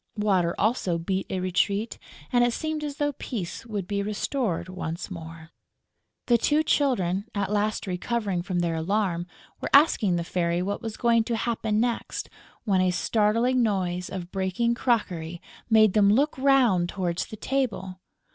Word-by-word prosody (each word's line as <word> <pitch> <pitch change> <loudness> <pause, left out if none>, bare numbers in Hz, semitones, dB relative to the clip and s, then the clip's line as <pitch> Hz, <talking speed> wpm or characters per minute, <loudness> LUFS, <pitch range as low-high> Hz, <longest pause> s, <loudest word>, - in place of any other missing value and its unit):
Water 190 -5 +2
also 205 -6 +1
beat 190 +3 -2
a 190 - -2
retreat; 200 +4 0 0.3
and 245 0 +5
it 240 -1 +2
seemed 315 +1 -3
as 290 -1 -4
though 290 0 +1
peace 230 -6 -6
would 205 -5 -4
be 200 -1 -1
restored 210 -2 -2
once 180 0 -5
more. 165 -2 -9 0.7
The 240 -1 +4
two 300 +6 +2
Children, 200 - +1
at 200 0 -1
last 210 +1 0
recovering 195 0 -2
from 175 0 -2
their 170 -1 0
alarm, 175 +1 -1 0.3
were - - -3
asking 275 - +5
the 170 - -1
Fairy 170 0 0
what 200 +2 -3
was 225 -2 -5
going 235 -2 +3
to 235 - -1
happen 220 -2 -1
next, 240 0 -2 0.3
when 195 -4 +2
a 185 - +3
startling 225 +6 +2
noise 180 -5 0
of 180 -2 -6
breaking 195 +5 0
crockery 180 -9 -1 0.3
made 215 -3 +5
them 205 -2 +5
look 280 +8 +2
round 255 -10 +3
towards 180 -3 -2
the 215 - -9
table. 215 -8 -2
200 Hz, 160 wpm, -26 LUFS, 180-235 Hz, 0.7 s, and